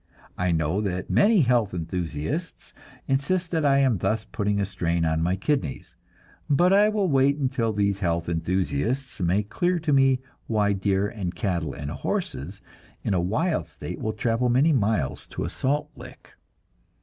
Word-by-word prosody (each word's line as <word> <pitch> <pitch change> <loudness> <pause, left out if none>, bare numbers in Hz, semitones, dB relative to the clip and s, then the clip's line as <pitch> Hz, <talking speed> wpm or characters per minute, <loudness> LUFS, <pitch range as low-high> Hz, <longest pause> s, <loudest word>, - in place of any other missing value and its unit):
I 90 -1 0
know 80 +4 0
that 95 -3 -3
many 205 -2 +5
health 120 -7 +2
enthusiasts 80 -3 -4 0.3
insist 165 +6 0
that 160 -2 0
I 140 -1 +4
am 130 -7 +3
thus 110 +4 0
putting 105 -1 -1
a 100 - +1
strain 85 -3 -1
on 80 0 +1
my 90 +3 +1
kidneys, 95 - -2 0.5
but 175 +6 +4
I 205 +2 +5
will 210 -3 +1
wait 140 -1 +3
until 130 -5 0
these 100 -1 0
health 85 -3 -1
enthusiasts 95 - -1
make 95 +4 0
clear 180 0 +1
to 160 -3 0
me 135 -1 +4 0.3
why 105 -2 +2
deer 95 0 +1
and 95 -5 -5
cattle 85 -4 -2
and 70 0 -5
horses 85 +10 -4 0.4
in - - 0
a 90 - +2
wild 155 - 0
state - - -7
will 110 - -2
travel 115 +3 0
many 135 +7 +4
miles 100 - 0
to - - -5
a - - -2
salt 150 +3 -1
lick. 125 -1 -13
105 Hz, 165 wpm, -25 LUFS, 90-135 Hz, 0.5 s, many